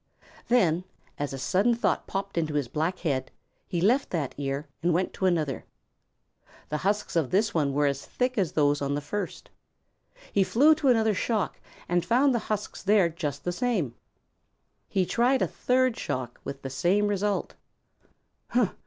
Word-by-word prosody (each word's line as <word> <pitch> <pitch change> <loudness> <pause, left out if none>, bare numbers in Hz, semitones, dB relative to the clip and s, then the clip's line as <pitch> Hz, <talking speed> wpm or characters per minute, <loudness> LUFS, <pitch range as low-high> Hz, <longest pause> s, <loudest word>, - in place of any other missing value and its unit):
Then, 180 -8 +3 0.4
as 145 0 -2
a 135 - -5
sudden 200 - +2
thought 235 - 0
popped 195 0 -4
into 155 -3 -1
his 145 -4 0
black 160 +8 -1
head, 135 -6 -1 0.4
he 175 - -2
left 240 +10 +3
that 155 -7 -2
ear 140 +1 -3
and 170 0 +2
went 185 +2 0
to 190 - 0
another. 155 -6 0 1.1
The 150 - -1
husks 200 +5 -1
of 160 -6 +2
this 205 +3 +2
were 145 -2 +1
as 140 -1 0
thick 250 0 -1
as 190 -6 +1
those 145 -1 +2
on 140 0 0
the - - 0
first. 180 +6 -5 0.8
He 200 - +4
flew 285 +11 +5
to 305 -2 -1
another 220 -4 +4
shock 210 +1 -1 0.3
and 175 0 +1
found 260 +3 +3
the 235 - +1
husks 210 -1 -3
there 200 -3 +4
just 150 -4 -4
the 175 - -1
same. 190 - -1 1.0
He 190 -2 +1
tried 245 +7 +2
a - - +1
third 255 -1 +1
shock 125 -2 -4
with 140 0 -7
the 135 - -5
same 180 +10 +2
result. 205 0 -1
180 Hz, 165 wpm, -27 LUFS, 145-215 Hz, 1.1 s, flew